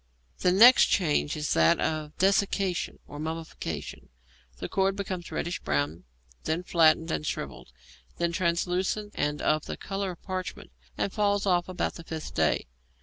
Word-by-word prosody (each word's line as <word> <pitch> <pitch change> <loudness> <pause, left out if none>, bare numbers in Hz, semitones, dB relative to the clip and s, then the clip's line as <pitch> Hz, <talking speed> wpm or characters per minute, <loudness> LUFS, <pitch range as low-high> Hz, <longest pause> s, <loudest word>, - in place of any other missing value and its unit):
The 180 - +3
next 235 +7 +8
change 155 -3 +1
is 150 0 -1
that 80 0 +4
of 155 -1 -2
desiccation 195 -1 +1
or 145 - -9
mummification; 160 - -5 0.5
the - - -5
cord 195 0 +1
becomes 185 -3 -5
reddish 175 - -2
brown, 75 +2 -2 0.4
then 160 +3 -1
flattened 165 -1 +3
and - - -1
shrivelled, - - -5 0.5
then 170 0 0
translucent 180 +4 0
and 150 0 -2
of 155 0 +1
the - - -5
colour 195 0 -3
of 175 - -8
parchment, 185 - -5 0.3
and 195 - -1
falls 205 -1 +1
off 180 -2 +2
about 185 - -2
the 170 - -10
fifth 160 -1 -6
day. - - +1
175 Hz, 150 wpm, -28 LUFS, 155-190 Hz, 0.5 s, next